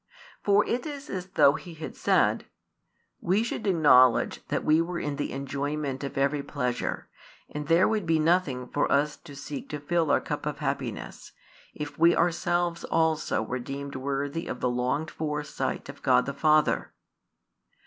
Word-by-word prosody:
For 205 0 +3
it 245 +6 -2
is 290 -1 -7
as 185 -1 -4
though 140 -6 +5
he 170 +3 -8
had 160 - -7
said: - - +2 0.7
"We 195 +5 +1
should 230 -2 -4
acknowledge 135 -9 +4
that - - -2
we 155 +2 +4
were 175 +1 -3
in 145 -1 -3
the 145 - -3
enjoyment 140 0 -3
of 140 - -5
every 140 +1 +1
pleasure, 125 -4 -3 0.4
and 150 -1 -6
there 165 +3 +5
would 215 -5 -1
be 165 -1 +3
nothing 155 -6 +1
for 145 - 0
us 145 +1 +2
to 145 -4 -13
seek 140 0 -7
to 150 - -4
fill 165 +2 0
our - - +4
cup - - -4
of - - -3
happiness, - - -4 0.4
if 150 0 -6
we 170 +1 +6
ourselves 175 0 0
also 160 -7 +1
were 125 +3 -3
deemed 140 +2 -6
worthy 140 +4 -3
of - - -5
the 125 - 0
longed 125 +6 -1
for 150 -1 -3
sight 150 - -4
of - - -10
God - - +3
the 140 - -3
Father." 155 +2 +2
150 Hz, 170 wpm, -27 LUFS, 140-170 Hz, 0.7 s, we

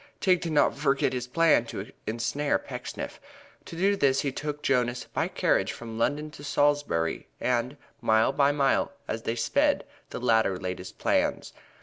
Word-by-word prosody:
Tigg 180 -3 +3
did 165 -2 -3
not 145 - +3
forget 135 -2 +1
his 125 -1 -3
plan 155 -3 +4
to 105 -2 -7 0.2
ensnare 120 +6 0
Pecksniff. - - -7 0.4
To - - -9
do 195 +4 +2
this 135 -7 +2
he 140 - -1
took 150 +2 -5
Jonas 125 -2 +1
by - - -2
carriage - - +1
from 115 -1 -8
London 150 +5 0
to 145 - -12
Salisbury 145 - +1
and, 125 +3 0 0.2
mile 110 0 +3
by 140 0 +3
mile, 140 0 +1
as 110 - -3
they 115 - -2
sped, 285 - +1 0.2
the - - -5
latter 110 -6 +2
laid 90 0 -4
his 90 0 -8
plans. - - 0
135 Hz, 170 wpm, -27 LUFS, 115-150 Hz, 0.4 s, plan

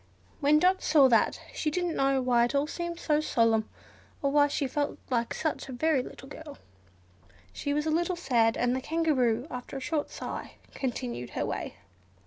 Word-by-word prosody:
When 295 +1 +4
Dot 365 +4 +3
saw 295 -4 +5
that, 230 -2 +3
she 310 - -1
didn't 350 +1 -1
know 270 -1 +2
why 240 -2 +4
it 240 - -3
all 280 +1 +3
seemed 345 +2 -5
solemn, 230 -9 +2 0.5
or 280 - +2
why 290 0 +5
she 285 0 -1
felt 290 +2 -2 0.3
such 315 -3 -2
a - - -5
very 300 +1 +2
little 265 - -10
girl. 295 0 -10 1.0
She 285 - -3
was 295 +1 0
a 315 - +1
little 345 +3 +1
sad, 235 -9 +2
and 245 +1 +1
the 260 - -2
Kangaroo, 260 -7 +1
after 250 +2 -6
a - - -3
short 295 +3 -2
sigh, - - -6 0.2
continued 125 - -4
her - - 0
way. - - -4
280 Hz, 175 wpm, -29 LUFS, 250-315 Hz, 1.0 s, saw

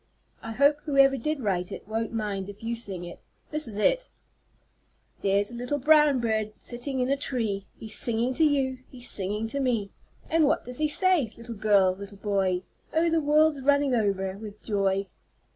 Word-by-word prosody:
I 225 - -6
hope 285 +4 +3
whoever 275 -2 +5
did 290 +3 -2
write 180 -5 -1
it - - -8
won't 225 +1 -2
mind 205 -4 -3
if 205 +2 -11
you 230 +1 -1
sing 195 -6 -5
it. 175 - -9 0.3
This 305 -3 -2
is 210 -3 -7
it: - - +2 1.1
"There's 200 +2 +2
a - - -8
little 245 +4 -2
brown 300 -1 +5
bird 220 -2 -1
sitting 255 +2 -4
up - - +2
in - - -3
a - - +4
tree, 225 -8 -2
He's 220 -1 -3
singing 235 +2 0
to 320 - +2
you 270 -4 +2
he's 250 -1 -7
singing 210 +3 -2
to 280 - -3
me. 230 -7 0 0.4
And 325 -1 +3
what 290 - +1
does 250 +2 -6
he 305 - +2
say, 325 - +2
little 230 0 -6
girl 200 -3 +4
little 200 +1 -8
boy? 195 -3 0 0.3
Oh, 330 +1 +2
the 325 0 +2
world's 300 0 +3
running 285 0 +3
over 195 -4 0
with 210 -1 -10
joy!" 195 -2 0
235 Hz, 190 wpm, -27 LUFS, 205-280 Hz, 1.1 s, whoever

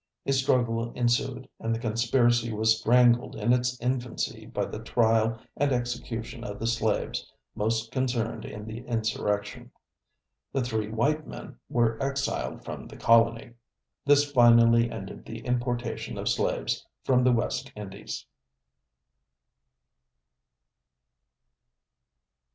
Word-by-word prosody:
A 135 - +1
struggle 120 -3 +1
ensued, 125 +2 0
and 115 0 -1
the - - -4
conspiracy 120 0 +2
was 110 +1 +2
strangled 120 +1 +4
in 115 +3 +2
its 125 0 0
infancy 125 -1 -2
by - - -2
the - - -6
trial 115 -1 +2 0.2
and 145 0 +1
execution 120 -2 -3
of 105 -4 -6
the 115 - -4
slaves 115 -2 -1 0.2
most 110 +2 -1
concerned 125 -3 -1
in 105 0 -7
the 110 +1 -6
insurrection. 110 0 -2 0.8
The 135 - +1
three 110 -3 -2
white 145 +8 0
men - - -9
were 115 -2 +1
exiled 135 - -2
from - - -7
the - - -12
colony. 115 +1 +3 0.5
This 145 0 +4
finally 115 -2 +6
ended - - -7
the - - -7
importation 120 -1 -2
of - - -4
slaves - - 0 0.2
from 125 -1 +3
the 125 - +5
West 120 -1 -1
Indies. 100 0 -7
120 Hz, 115 wpm, -27 LUFS, 115-125 Hz, 0.8 s, finally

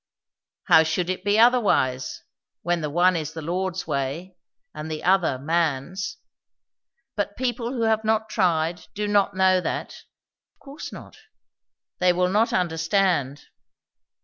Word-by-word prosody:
"How - - +6
should 165 +3 -1
it 185 - -5
be 205 +1 +2
otherwise, 205 - +2 0.4
when 175 0 0
the 150 - -2
one 175 +4 +3
is 160 -1 -3
the 160 - -6
Lord's 185 +2 -2
way, 140 +7 -3 0.4
and 150 +1 -7
the 155 -1 -5
other 180 -7 +2
man's? 165 +4 -2 1.0
But 205 -1 -3
people 245 -1 -2
who 235 -3 -2
have 220 -1 +2
not 220 0 +1
tried 175 -4 0
do 210 0 -2
not 200 -1 +2
know 185 -1 +3
that." - - -4 0.6
"Of - - -44
course 285 +2 -9
not." - - -11 0.8
"They 180 -1 +4
will 180 +1 +1
not 215 +4 +2
understand." 160 -4 0
180 Hz, 140 wpm, -24 LUFS, 160-205 Hz, 1.0 s, How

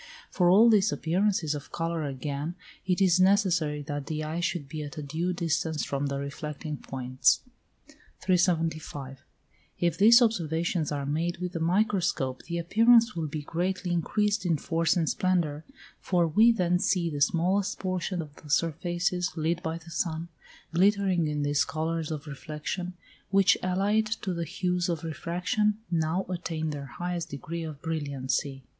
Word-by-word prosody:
For 175 -2 +3
all 210 +6 +7
these 210 -3 +4
appearances 175 -2 +1
of 145 -1 -7
colour 165 -1 -2
again 140 +4 -4 0.3
it 180 0 +2
is 185 -1 +4
necessary 180 -6 +3
that 145 -1 -5
the 155 -1 -3
eye 155 +2 -3
should 170 -4 -2
be 155 +2 -5
at 145 0 -7
a 150 - -4
due 160 +5 -2
distance 160 -3 -1
from 140 0 -2
the 140 0 -2
reflecting 150 +2 -5
points. 130 -1 +1 0.8
375. 160 -6 0 0.5
If 175 0 0
these 230 +4 +8
observations 170 - 0
are 140 -1 -2
made 165 +5 -1
with 180 0 -4
the 165 - -4
microscope, 170 -7 +1
the 170 0 -3
appearance 230 +7 +4
will 165 -2 -2
be 150 0 -5
greatly 180 +3 -2
increased 205 +4 +1
in 170 -4 +1
force 165 +2 +1
and 165 -2 +1
splendour, 165 -5 0 0.3
for 175 -3 +1
we 220 +9 +5
then 180 -5 +1
see 180 -2 +1
the 145 -1 -4
smallest 185 +7 +2
portion 185 -2 -2
of 150 -1 -14
the 150 - -14
surfaces, 175 +3 0
lit 165 +2 0
by 160 -1 -3
the 165 0 -13
sun, 165 0 -2 0.4
glittering 190 -2 +3
in 150 -1 -1
these 145 0 +2
colours 160 0 -2
of 155 -2 -5
reflection, 155 +5 -5 0.3
which, 195 0 +5
allied 200 +4 +1
to 210 -4 -3
the 170 -1 -3
hues 180 +1 -1
of 165 -2 -2
refraction, 180 +6 0 0.2
now 165 +3 0
attain 165 -3 -3
their 140 -2 -6
highest 175 +6 -4
degree 165 +4 -5
of 155 -3 -7
brilliancy. 140 -3 -2
170 Hz, 160 wpm, -28 LUFS, 150-180 Hz, 0.8 s, these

